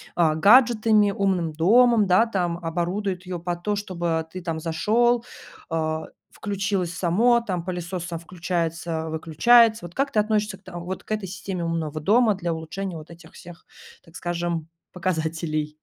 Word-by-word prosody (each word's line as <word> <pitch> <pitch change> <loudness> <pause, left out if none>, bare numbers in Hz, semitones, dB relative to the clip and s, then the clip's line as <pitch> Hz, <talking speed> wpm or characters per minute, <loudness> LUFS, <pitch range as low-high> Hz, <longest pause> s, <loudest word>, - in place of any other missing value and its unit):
а, 160 -3 +3
гаджетами, 215 +1 +5
умным 185 -5 0
домом, 220 +5 +4
да, 185 +5 +5
там, 180 -6 -1
оборудуют 180 +3 -3
ее 180 -1 -5
под 175 0 -4
то, 210 -1 0
чтобы 170 -5 -2
ты, 185 - -7
там, 165 -2 -3
зашел, 225 +9 +1 0.5
а, 160 -1 -2 0.2
включилось 195 -3 -2
само, 210 +8 +3
там, 185 -7 -4
пылесос 180 0 -4
сам 170 -2 -5
включается, 165 -2 -3
выключается. 220 +7 +4
Вот 175 - -11
как 275 0 0
ты 215 - +2
относишься 210 -2 0
к 195 - -31
та 185 -2 -9
вот 180 +2 -6
к - - -12
этой 215 -3 -2
системе 190 -1 -5
умного 160 -2 -3
дома 215 +4 +3
для 175 -3 -2
улучшения 170 +3 -5
вот 155 +1 -11
этих 170 -1 -14
всех, 175 0 -13 0.4
так 165 - -19
скажем, 170 -2 -3 0.2
показателей 160 -4 -2
180 Hz, 160 wpm, -24 LUFS, 165-205 Hz, 0.5 s, гаджетами